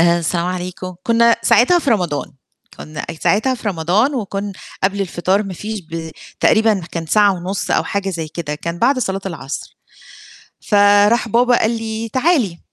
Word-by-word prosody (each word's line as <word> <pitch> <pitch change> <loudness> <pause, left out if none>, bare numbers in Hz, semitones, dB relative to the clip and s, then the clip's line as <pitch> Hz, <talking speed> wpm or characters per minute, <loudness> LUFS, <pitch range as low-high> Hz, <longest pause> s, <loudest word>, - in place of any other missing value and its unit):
آآ 170 0 +4
السلام 170 +1 -1
عليكم 185 0 -5
كنا 235 +1 +4
ساعتها 350 +9 +4
في 280 -6 -1
رمضان، 175 -9 -1 0.4
كنا 155 -1 -7 0.2
ساعتها 255 +6 +2
في 230 - -4
رمضان، 195 - +1
وكنا 200 -3 -3 0.3
قبل 200 +1 0
الفطار 190 +1 0
ما 195 -3 -6
فيش 215 +2 -5
ب 165 -1 -7 0.3
تقريبًا 220 -3 +3
كان 165 -1 -4
ساعة 205 +4 +4
ونص 185 +3 -4
أو - - +2
حاجة 200 -1 -2
زي 165 -3 -4
كده 155 -1 -5
كان 170 +3 -5
بعد 270 +7 +3
صلاة 195 -5 -2
العصر. 145 -7 -6 0.9
فراح 205 +3 +4
بابا 245 +2 +3
قال 220 - +2
لي: 225 -1 -4
"تعالي" 260 - +1
200 Hz, 160 wpm, -18 LUFS, 175-225 Hz, 0.9 s, آآ